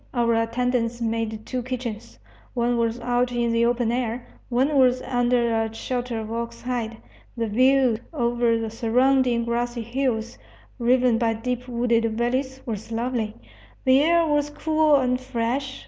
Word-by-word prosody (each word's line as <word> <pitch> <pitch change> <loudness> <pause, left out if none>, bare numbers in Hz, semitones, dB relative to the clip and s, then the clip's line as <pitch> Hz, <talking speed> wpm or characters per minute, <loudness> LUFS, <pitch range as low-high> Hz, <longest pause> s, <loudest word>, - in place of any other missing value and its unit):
Our 235 -1 +2
attendants 235 +1 0
made 225 -1 -2
two 255 -1 -3
kitchens: 235 - -6 0.4
one 240 0 +1
was 230 +1 0
out 245 +1 +1
in 240 -1 0
the 230 0 +3
open 240 -1 +1
air, 240 0 -2 0.2
one 260 +4 +1
was 255 -2 +4
under 245 -2 +1
a 225 0 0
shelter 245 -1 -3
of 220 0 -6
ox 235 0 -4
hide. 235 -3 -3 0.4
The 230 - 0
view 255 +1 +3
over 240 -5 +1
the 225 -1 -3
surrounding 245 +1 +2
grassy 240 0 -2
hills, 235 - -2 0.4
riven 245 -1 +3
by 225 -2 +1
deep 250 +2 -3
wooded 235 -1 +1
valleys, 260 +3 -1
was 220 -1 -5
lovely. 230 -2 -2 0.5
The 260 +1 +5
air 335 +2 +4
was 295 -1 +1
cool 310 0 +2
and 250 -2 +2
fresh. 260 +2 -2
240 Hz, 150 wpm, -24 LUFS, 230-255 Hz, 0.5 s, The